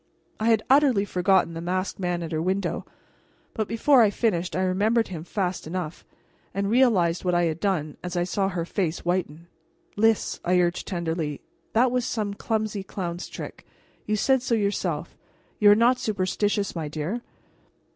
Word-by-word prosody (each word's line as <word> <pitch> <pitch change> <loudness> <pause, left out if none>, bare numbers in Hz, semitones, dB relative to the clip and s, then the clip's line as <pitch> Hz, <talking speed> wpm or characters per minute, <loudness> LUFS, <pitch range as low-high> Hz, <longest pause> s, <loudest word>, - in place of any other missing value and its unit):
I 215 - -1
had 220 -2 +3
utterly 265 -7 +4
forgotten 185 -2 +2
the 165 - -5
masked 185 +3 -2
man 175 -2 -1
at 165 - -6
her 155 -1 -1
window, 190 +3 -1 0.7
but 215 -2 -2
before 250 +3 +4
I 215 - +6
finished 185 -5 -1
I 185 - +1
remembered 210 +5 +2
him 165 -4 -6
fast 180 -2 -3
enough, 175 -1 -5 0.5
and 200 +1 0
realized 205 -9 +3
what 180 -1 +1
I 175 - +3
had 160 -1 -1
done 170 -7 -1
as 180 0 -4
I 175 - +2
saw 195 +2 0
her 175 -3 -3
face 175 -3 -2
whiten. 170 -2 -2 0.5
"Lys," 225 +1 +2
I 180 +1 +3
urged 175 0 0
tenderly, 165 -5 -2 0.3
"that 240 +2 +4
was 250 0 +1
only 210 -3 -2
some - - -5
clumsy 215 -1 -2
clown's 175 -2 -5
trick. - - -8 0.4
You 215 - +1
said 265 +4 +2
so 240 -2 +1
yourself. 185 -7 -1 0.4
You 210 - +7
are 205 - +8
not 240 +3 +4
superstitious, 205 0 -1
my 160 -3 -3
dear?" 155 +10 -3
190 Hz, 175 wpm, -25 LUFS, 175-215 Hz, 0.7 s, are